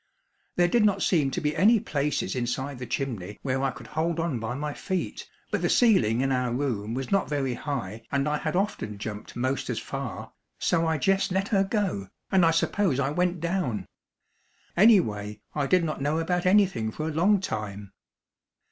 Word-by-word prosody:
There 175 0 +4
did 230 +5 +3
not 200 -2 +2
seem 155 -7 +2
to 155 - -2
be 150 -2 -1
any 215 +7 +5
places 145 -6 -1
inside 130 +2 -2
the 125 - -6
chimney 110 -7 -3
where 135 -1 0
I 135 - +2
could - - -9
hold 165 +2 -1
on 165 -7 -1
by 115 +2 -3
my 150 +1 -3
feet, 185 +4 -4 0.2
but - - 0
the - - +1
ceiling 125 - +4
in 135 0 +1
our 125 -2 0
room 120 -4 -2
was 135 0 -4
not 195 -1 +2
very 140 -4 0
high 115 -6 -5
and 140 0 +1
I 150 0 +1
had 155 +1 -2
often 180 - -1
jumped 105 0 -7
most 130 +2 -1
as - - -1
far, - - -5 0.2
so 165 0 +1
I 160 - +1
jes' 195 +7 +2
let 195 +2 0
her 195 -3 +3
go, 195 - -1 0.2
and 190 -2 +4
I 165 - +6
suppose 165 -2 +1
I 140 0 +1
went 180 +1 0
down. 165 - -1 0.9
Anyway, 110 - +4
I 145 -2 0
did 180 +1 +3
not 155 -3 -3
know 145 +3 +1
about 175 +2 0
anything 190 - +3
for 155 +8 -4
a - - -2
long 195 +6 +4
time. 105 - -5
150 Hz, 190 wpm, -27 LUFS, 125-180 Hz, 0.9 s, I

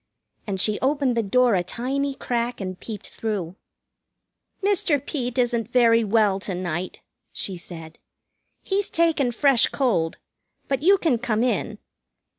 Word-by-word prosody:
And 195 -2 -2
she 210 +2 +1
opened 275 -2 +1
the 230 - +2
door 245 +3 +3
a 185 - +3
tiny 270 +8 -2
crack 240 -1 -2
and 185 -2 -5
peeped 215 -4 -7
through. 195 -6 -4 1.1
"Mr. 370 -7 +2
Peet 260 -3 -4
isn't 240 -2 0
very 230 -2 +5
well 210 -2 +2
to 190 -1 -4
night," 180 0 -4 0.3
she 190 - -4
said. 165 -2 -10 0.6
"He's 395 0 -1
taken 320 -6 +2
fresh 270 0 +3
cold. 195 -12 0 0.5
But 270 -1 -1
you 390 +5 +5
can 310 -11 +1
come 230 -2 0
in." 240 -6 -1
235 Hz, 140 wpm, -24 LUFS, 195-270 Hz, 1.1 s, very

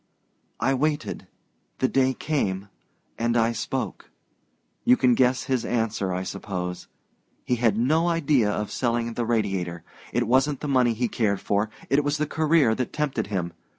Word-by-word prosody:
"I 135 - +2
waited 150 +2 -1 0.5
the 130 - +2
day 130 0 +2
came, 100 -10 -2 0.5
and 115 +1 +1
I 115 0 +3
spoke. 115 - -4 0.7
You 125 - +5
can 125 -1 +4
guess 125 +1 +2
his 130 -3 0
answer, 110 -5 -1
I 90 +1 -2
suppose. 90 -2 -5 0.6
He 125 - +1
had 115 -3 +2
no 155 +8 +2
idea 145 -9 +2
of 105 0 -2
selling 120 -1 -1
the 120 0 -2
Radiator. 95 -7 -1 0.3
It 120 0 +1
wasn't 135 +3 +2
the 150 - -3
money 125 -4 +3
he 120 +2 0
cared 105 -4 0
for 105 +2 0 0.2
it 145 +2 +2
was 145 +1 0
the 150 - 0
career 155 -5 +3
that 125 +1 -2
tempted 140 -8 -1
him. 90 -4 -3
120 Hz, 160 wpm, -25 LUFS, 105-135 Hz, 0.7 s, You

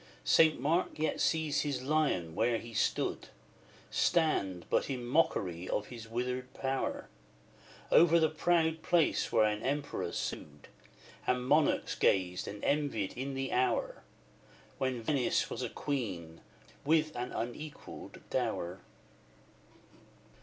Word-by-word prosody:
St. 160 -4 +5
Mark 160 +7 0
yet 155 +1 -1
sees 160 -2 +1
his 140 -4 -2
lion 135 - +1
where 115 +5 +2
he 115 +1 -9
stood - - 0 0.6
Stand, 100 - +1
but - - +1
in 125 -3 -3
mockery 95 - +1
of 105 - -2
his 115 -2 -9
withered 125 +2 -3
power, 135 0 -2 0.8
Over 170 0 +6
the 160 - +4
proud 160 0 +1
place 170 -3 +2
where 110 - +4
an 105 0 +1
Emperor 135 -10 -2
sued, 75 -1 -5 0.6
And 125 0 +1
monarchs 150 +3 +3
gazed 90 -2 +1
and 105 0 -7
envied 140 -9 0
in 135 +2 -4
the 135 0 -2
hour 130 +1 0 0.8
When 130 -3 -1
Venice 130 0 +1
was - - -4
a - - -2
queen 95 - -4 0.4
with 155 +1 +2
an 125 +1 -3
unequalled 150 +6 -7
dower. 90 +2 -1
130 Hz, 125 wpm, -32 LUFS, 105-155 Hz, 0.8 s, Over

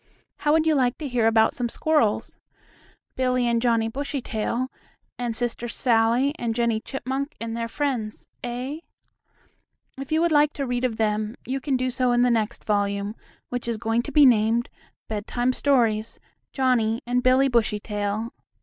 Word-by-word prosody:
How 295 - +1
would 315 +1 +3
you 320 - +4
like 255 -4 +1
to 305 - -5
hear 240 -3 +1
about 220 0 +4
some 245 -2 -2
squirrels? 270 -7 +1 0.8
Billie 255 -1 +1
and 235 -1 +1
Johnnie 230 -2 +2
Bushytail 255 -2 -3 0.5
and 240 -2 -2
Sister 240 0 -2
Sallie 235 +3 +2
and 230 -2 -2
Jennie 235 -2 +1
Chipmunk 270 +3 -4
and 230 0 -4
their 230 0 -2
friends, 240 -5 -3 0.2
eh? 250 +5 -4 1.2
If 275 +1 -7
you 315 - +3
would 340 0 +2
like 295 0 +4
to 280 - -3
read 245 0 -1
of 230 -3 -2
them 215 0 0
you 265 +1 -3
can 275 -2 0
do 255 0 -1
so 250 -1 +1
in 240 0 +3
the 250 - +3
next 225 -1 -1
volume, 200 0 0 0.4
which 245 -1 -4
is 230 -2 -1
going 225 +1 0
to 285 - -7
be 290 +1 +6
named, 230 -1 +3 0.4
"Bedtime 240 +4 -1
Stories: 230 -6 +1 0.3
Johnnie 240 -4 +1
and 245 +1 +1
Billie 255 +2 +4
Bushytail." 210 -2 -1
240 Hz, 165 wpm, -24 LUFS, 225-260 Hz, 1.2 s, be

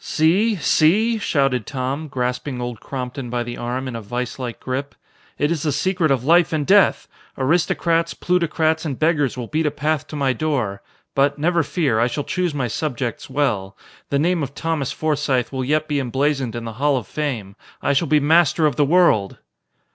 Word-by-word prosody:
"See? 190 +8 +2
See?" 200 +8 +3
shouted 135 - 0
Tom, 135 +3 -3
grasping 125 0 -3
Old 120 -2 -4
Crompton 125 0 -5
by 120 0 -1
the 120 0 -6
arm 125 +2 -3
in 125 - -5
a 115 - -5
viselike 120 +2 -4
grip. 135 +2 -4 0.4
"It 145 +2 +1
is 165 -4 -1
the 150 - 0
secret 180 +2 +1
of 135 -3 +1
life 170 +4 +4
and 155 -3 0
death! 200 +3 +4 0.3
Aristocrats, 165 +3 +1
plutocrats 160 -3 +1
and 145 -6 -3
beggars 155 -5 +1
will 125 - -4
beat 155 +5 0
a - - +3
path 150 0 -2
to - - -8
my 135 -3 +1
door. 125 -11 -2 0.3
But, 140 +1 +2
never 170 +3 +2
fear, 145 -7 0
I 120 - +3
shall 145 +4 -3
choose 180 +2 -1
my 135 -4 -1
subjects 125 -2 -3
well. 110 -9 -1 0.3
The 140 - +1
name 170 +3 +1
of 140 -1 -5
Thomas 160 -5 -2
Forsythe 145 -4 0
will 130 -1 -2
yet 155 +4 0
be 145 -1 0
emblazoned 135 -1 -1
in 120 -1 -5
the 115 - -5
Hall 145 -2 +3
of 120 - -4
Fame. 115 -8 -4 0.2
I 140 - +1
shall 150 +4 +1
be 155 -1 +4
master 160 +1 +3
of 145 -5 +1
the 145 - +4
world!" 145 - +3
140 Hz, 190 wpm, -21 LUFS, 125-160 Hz, 0.4 s, life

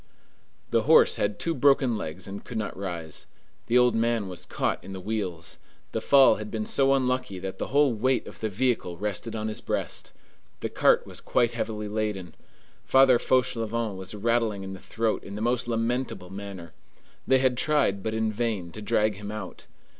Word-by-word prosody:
The - - +2
horse - - +6
had 100 0 0
two 165 - -1
broken 135 -3 +3
legs 90 -1 -5
and 100 +1 -7
could 120 - -6
not 110 - -3
rise. 85 -5 -5 0.4
The 120 - +4
old 125 -1 +5
man 115 -2 +1
was 90 -2 -7
caught - - -1
in 95 - -8
the 95 - -6
wheels. 95 -5 -4 0.3
The 110 - -2
fall 135 -1 +6
had 105 0 -6
been 110 -1 -3
so 135 +3 +3
unlucky 130 -6 -1
that 95 +1 -6
the - - -2
whole 140 -2 +3
weight 130 +4 +1
of - - -11
the 110 - -1
vehicle 110 -5 0
rested 105 +3 -3
on 110 0 -2
his 110 - -3
breast. - - -3 0.5
The - - -2
cart - - +3
was - - -7
quite 120 -2 +2
heavily 110 -2 -3
laden. 105 -5 -3 0.5
Father 130 -2 +5
Fauchelevent 115 -4 0
was 95 +2 -6
rattling 110 -2 0
in 95 0 -6
the 95 - -8
throat 115 +2 -1
in 100 - -8
the - - -5
most 120 +2 0
lamentable 115 -4 -2
manner. 95 -5 -8 0.5
They 130 - +5
had 130 -1 +2
tried, 140 -9 +2
but 110 +2 -2
in 110 -1 0
vain, 105 -6 -2
to 105 - -8
drag 105 0 +1
him 105 0 -6
out. 105 -4 -8
110 Hz, 190 wpm, -27 LUFS, 100-120 Hz, 0.5 s, horse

